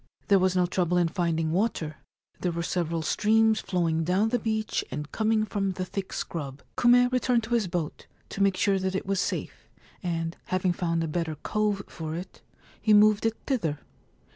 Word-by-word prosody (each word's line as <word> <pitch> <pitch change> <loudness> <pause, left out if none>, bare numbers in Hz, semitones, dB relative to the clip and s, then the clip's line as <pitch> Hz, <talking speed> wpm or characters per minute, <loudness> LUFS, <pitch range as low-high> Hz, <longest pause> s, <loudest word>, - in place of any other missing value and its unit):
There 200 -1 +6
was 185 0 +2
no 180 -1 +3
trouble 180 0 0
in 175 -1 +3
finding 165 -2 0
water: 170 -5 -1 0.4
there 180 - 0
were 170 0 -3
several 170 -2 -1
streams 220 +5 +3
flowing 170 -4 0
down 190 +6 +2
the 245 +1 +1
beach 220 -1 -1
and 150 +3 -5
coming 220 0 +1
from 195 -3 -1
the 185 0 -3
thick 190 +1 -5
scrub. 140 -4 -5
Kume 245 +1 +5
returned 250 -2 +2
to 230 +2 -4
his 225 -5 +2
boat, 170 -3 -4 0.2
to 200 - -4
make 195 -1 +3
sure 195 0 +2
that 190 0 -2
it 195 - -2
was 195 0 0
safe, - - -3 0.3
and, 165 -2 -2
having 185 -1 0
found 165 -1 -1
a - - -1
better 160 0 -2
cove 210 +4 -1
for 160 -1 -6
it, 180 +2 -8 0.4
he 215 -1 +5
moved 210 +1 +5
it 225 - -2
thither. 170 - 0
185 Hz, 190 wpm, -27 LUFS, 165-215 Hz, 0.4 s, There